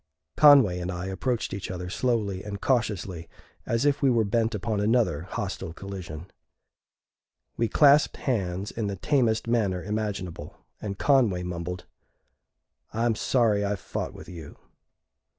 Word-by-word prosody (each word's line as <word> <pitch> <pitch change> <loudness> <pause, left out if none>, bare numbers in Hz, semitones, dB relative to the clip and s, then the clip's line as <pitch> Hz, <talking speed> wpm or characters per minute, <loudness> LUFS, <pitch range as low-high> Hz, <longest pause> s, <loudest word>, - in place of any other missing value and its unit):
Conway 135 -12 +7
and 90 +1 -3
I 90 0 -4
approached 115 +5 -2
each 100 - -5
other 90 -1 -5
slowly 105 -2 -1
and 100 -1 -6
cautiously, 100 -9 -1 0.4
as 115 +4 +1
if 145 -1 +2
we 140 - +4
were 115 -3 +3
bent 115 +2 0
upon 105 +1 -2
another 105 -7 +1
hostile 95 -5 -4
collision. 90 -4 -7 1.3
We 115 - +1
clasped 145 +4 +5
hands 100 -5 -2
in 110 -3 -3
the 100 - -3
tamest 115 - +1
manner 100 -6 0
imaginable, 105 -4 -4 0.2
and 100 -2 -4
Conway 115 -11 +3
mumbled, 90 0 -5 1.1
"I'm 115 +1 +1
sorry 110 -2 +2
I 100 0 0
fought 95 - -5
with - - -11
you." 85 -3 -10
105 Hz, 135 wpm, -26 LUFS, 90-115 Hz, 1.3 s, Conway